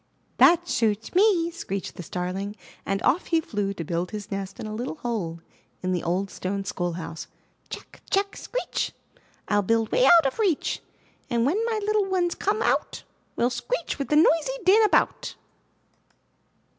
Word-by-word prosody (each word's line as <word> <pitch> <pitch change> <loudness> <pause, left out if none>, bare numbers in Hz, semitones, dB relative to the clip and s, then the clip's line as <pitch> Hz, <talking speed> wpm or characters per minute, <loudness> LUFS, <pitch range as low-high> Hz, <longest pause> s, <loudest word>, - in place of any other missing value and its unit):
'That 345 0 +6
suits 220 -6 0
me!" 360 -3 +4
screeched 200 - -5
the - - -8
Starling 185 +4 -4 0.3
and 195 0 -1
off 330 +7 +2
he 330 - +3
flew 205 -10 -2
to 185 -4 -5
build 170 +2 -2
his 210 -1 -7
nest 195 -1 -4
in - - -5
a 215 - -5
little 240 +7 -4
hole 200 - -3 0.4
in 185 - 0
the 180 -2 0
old 185 +3 -1
stone 195 +1 -3
schoolhouse: 175 -3 -4 0.4
"Tchack! - - -9
Tchack! 395 +1 +1
Screech! - - -3 0.6
rU 205 0 +4
build 225 +2 +1
way 255 - +4
out 335 +1 +7
of 270 - -1
reach! 380 -9 +1 0.5
And 235 -2 +1
when 375 +11 +1
my 450 -2 0
little 425 -1 +2
ones 365 -2 +1
come 425 +3 0
out, - - 0 0.3
We'll 240 +2 +1
screech - - -3
with 275 - -3
noisy 325 +10 +4
din 415 +4 +6
about!" 420 - +1
235 Hz, 160 wpm, -25 LUFS, -, 0.6 s, out